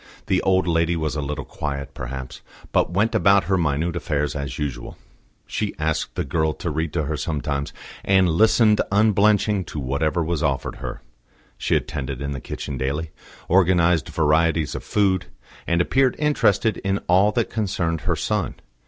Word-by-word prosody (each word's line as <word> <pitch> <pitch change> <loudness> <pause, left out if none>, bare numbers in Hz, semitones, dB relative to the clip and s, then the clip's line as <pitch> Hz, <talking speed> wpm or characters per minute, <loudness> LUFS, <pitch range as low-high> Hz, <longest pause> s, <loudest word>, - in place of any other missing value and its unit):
The - - +1
old 95 0 +2
lady 85 0 +2
was 80 -3 -2
a 75 - -1
little 75 +1 -4
quiet, 70 -3 -5
perhaps, 65 +1 -7 0.3
but - - +2
went 100 +6 +1
about 100 -1 +4
her 95 - +1
minute 80 0 0
affairs 75 -2 -1
as 70 -2 -4
usual. 70 -5 -5 0.5
She - - -3
asked 80 0 -2
the - - -1
girl 80 +2 0
to 85 - -4
read 80 +1 -2
to 80 - 0
her 75 +2 -2
sometimes, 70 -2 -2 0.3
and 95 -1 +4
listened 105 +5 +4
unblenching 105 -1 +3
to 75 - -6
whatever 75 +6 0
was 80 -1 -2
offered 70 -2 -1
her; - - -7 0.5
she - - 0
attended 70 -3 -3
in 70 0 -3
the 70 -2 -5
kitchen 70 -3 -6
daily, 75 +5 -2 0.4
organised 90 -3 +3
varieties 80 0 +2
of - - -5
food, 95 -3 +1 0.4
and 85 0 +2
appeared 130 +8 +2
interested 115 -7 +2
in 95 0 -1
all 95 +4 +4
that 120 0 0
concerned 90 -6 -1
her - - 0
son. - - -1
80 Hz, 165 wpm, -23 LUFS, 75-95 Hz, 0.5 s, about